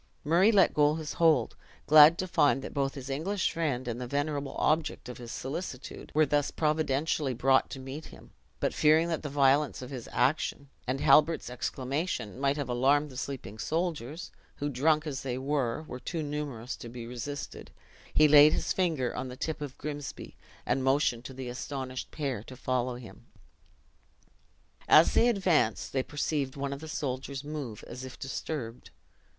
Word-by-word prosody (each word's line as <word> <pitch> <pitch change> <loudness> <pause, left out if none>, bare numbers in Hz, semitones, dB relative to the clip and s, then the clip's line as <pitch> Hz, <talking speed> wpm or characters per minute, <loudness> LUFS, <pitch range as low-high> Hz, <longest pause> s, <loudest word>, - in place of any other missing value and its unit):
Murray 175 +8 +4
let 200 -4 +4
go 150 0 +3
his 155 -2 -5
hold, 155 -8 +4 0.3
glad 155 +2 +8
to 185 - -2
find 135 -6 +3
that - - -7
both 135 -1 -1
his 135 -2 -7
English 175 +9 -1
friend 140 -7 -2
and 120 +1 -3
the 125 - -4
venerable 145 +1 -2
object 155 -4 0
of 125 - -8
his 120 -1 -8
solicitude 140 -1 -6
were 155 0 +5
thus 145 -1 +1
providentially 150 -2 0
brought 135 +2 +3
to 135 - -7
meet 135 +4 -7
him; - - -14 0.3
but - - 0
fearing 160 +2 +4
that 165 - -1
the 150 - -5
violence 140 0 +3
of 125 - -9
his 125 -4 -7
action, 140 -1 0 0.2
and 130 +2 -1
Halbert's 155 -4 +4
exclamation, 130 - -3
might 140 +1 +1
have 145 -3 -3
alarmed 135 +4 +2
the - - -12
sleeping 125 -6 -6
soldiers 160 0 -3 0.2
(who, 145 - -3
drunk 150 +4 +2
as 145 -3 -4
they 125 -2 -3
were, 135 0 -1
were 125 -5 -8
too 165 +4 -4
numerous 145 -5 -4
to 120 - -9
be 120 0 -8
resisted), 125 +4 -6 0.4
he 155 - +5
laid 150 +1 +8
his - - 0
finger 160 -10 0
on 130 - -3
the 125 0 -8
tip 155 +1 -3
of 140 -2 -6
Grimsby, 145 -2 -6 0.3
and 135 - 0
motioned 130 -3 +1
to 135 - -7
the 130 -1 -6
astonished 130 +1 -5
pair 135 -8 -3
to 130 - -10
follow 125 -1 -1
him. 115 -6 -12 1.6
As 155 - +7
they 235 - +5
advanced, 180 - +1
they 130 - +2
perceived 145 -1 -2
one 140 0 -3
of 140 - -7
the 160 - -9
soldiers 135 -2 -4
move 145 -8 -6
as 125 +2 -8
if 130 0 -9
disturbed. 130 -3 -5
140 Hz, 175 wpm, -29 LUFS, 130-155 Hz, 1.6 s, glad